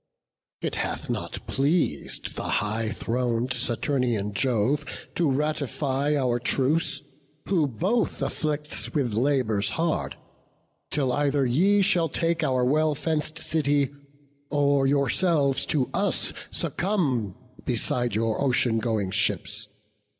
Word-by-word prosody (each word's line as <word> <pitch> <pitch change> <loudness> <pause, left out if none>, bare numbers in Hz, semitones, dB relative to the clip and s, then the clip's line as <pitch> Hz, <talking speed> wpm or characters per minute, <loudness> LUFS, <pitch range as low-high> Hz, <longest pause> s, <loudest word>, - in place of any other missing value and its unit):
It - - -2
hath - - -2
not - - -4
pleas'd 140 - 0
high 110 +1 -1
thron'd 120 +2 -1
Saturnian 120 -3 0
Jove 125 +4 +1 0.3
To 170 -4 +1
ratify 145 0 0
our 125 -3 +1
truce, 140 +3 0 0.4
who 170 -6 +2
both 190 - 0
afflicts 150 0 -1
With 130 -7 +1
labours 115 -4 +1
hard, 165 -1 -1 0.7
till 135 -4 +1
either 145 0 +2
ye 190 +11 +3
shall 170 -4 +2
take 165 +2 0
Our 130 -3 +2
well 155 +3 +2
fenc'd 155 +1 -1
city, 145 -4 +1 0.6
or 140 -1 +3
yourselves 140 +1 +2
to 135 -5 +1
us - - +1 0.2
Succumb 140 - -1 0.3
beside 120 -2 -1
your 110 0 0
ocean 120 -3 +2
going 110 -5 -1
ships. 105 +2 -1
140 Hz, 110 wpm, -26 LUFS, 120-150 Hz, 0.7 s, ye